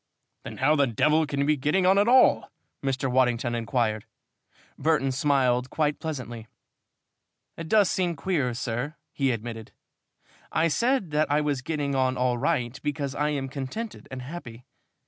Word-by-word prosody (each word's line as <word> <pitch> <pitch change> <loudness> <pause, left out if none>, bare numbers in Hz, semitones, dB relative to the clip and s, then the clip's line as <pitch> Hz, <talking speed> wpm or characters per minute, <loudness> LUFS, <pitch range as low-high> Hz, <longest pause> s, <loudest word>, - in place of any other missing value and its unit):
"Then - - -8
how 145 +4 +3
the 140 -2 +3
devil 150 +7 +2
can 140 -1 -2
you - - +2
be 150 +1 +3
getting 150 +7 +1
on 190 +2 +5
at 205 - +3
all?" 255 +1 +5 0.3
Mr. 135 0 -1
Waddington 125 -2 +1
inquired. 115 -2 -1 0.7
Burton 145 -3 +1
smiled 130 -2 +1
quite 150 -2 0
pleasantly. 125 -8 -6 1.1
"It 165 -1 -7
does 210 -3 +5
seem 175 -1 0
queer, 140 -6 -1
sir," 125 +5 -3 0.2
he 135 -2 +1
admitted. 115 -2 -5 0.8
"I 165 +1 +2
said 235 - +1
that 150 +1 +1
I 145 - +3
was 145 -3 -1
getting 145 0 -2
on 130 -1 +1
all 125 -1 +1
right 125 -4 -1
because 145 -2 -3
I 150 +1 0
am 140 -3 -2
contented 140 - -6
and 130 -1 -7
happy. 125 -5 -9
140 Hz, 160 wpm, -26 LUFS, 125-155 Hz, 1.1 s, on